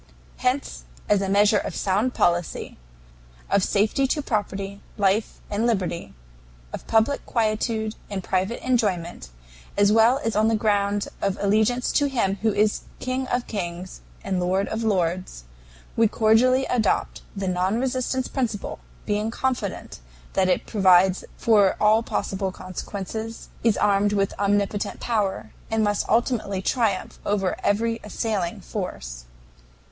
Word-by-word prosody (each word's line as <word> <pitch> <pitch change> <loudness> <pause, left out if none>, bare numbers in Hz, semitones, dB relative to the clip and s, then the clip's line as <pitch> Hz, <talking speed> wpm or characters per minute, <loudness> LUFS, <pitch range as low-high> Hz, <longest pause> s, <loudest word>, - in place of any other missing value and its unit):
"Hence 255 +2 -1 0.2
as 205 -1 +3
a 195 - -1
measure 205 +1 +4
of - - -5
sound 205 +6 0
policy 175 0 0 0.8
of 200 - +3
safety 220 +9 +2
to 295 +2 -1
property, 200 -4 -3 0.2
life, 200 +1 +1
and 215 +3 +1
liberty 185 - -2 0.6
of - - -7
public 225 +6 +2
quietude 220 -1 0 0.2
and 195 -3 -4
private 190 +6 -1
enjoyment 190 - 0 0.5
as 205 0 +5
well 225 +4 +5
as 225 - 0
on 215 +1 +3
the 225 - +3
ground 205 -1 +1
of 195 -1 0
allegiance 220 +5 +2
to 290 - +2
Him 225 -8 0
who 220 0 +2
is 210 +1 +1 0.2
King 255 +1 -2
of 245 -1 -1
kings 180 -3 -5 0.2
and 190 -2 -1
Lord 185 +2 +1
of 220 - -3
lords, 180 - -1 0.5
we 225 0 +4
cordially 235 +5 +3
adopt 230 -4 0
the 195 -1 -3
non 185 +4 0
resistance 255 0 -1
principle, 235 -6 -3 0.3
being 210 +1 0
confident 240 - -3 0.3
that 190 -1 +2
it 180 - +1
provides 190 -2 +4
for 205 -4 +4
all 215 +1 +5
possible 195 -4 -2
consequences, 200 +4 -6
is 225 -2 +3
armed 205 0 +2
with 195 -1 +1
omnipotent 205 0 0
power, 200 - -1 0.2
and 225 -1 +1
must 205 -1 0
ultimately 225 -4 +1
triumph 205 -2 -1
over 195 -3 0
every 225 +3 +1
assailing 210 -4 -2
force. - - -6
205 Hz, 135 wpm, -24 LUFS, 195-225 Hz, 0.8 s, as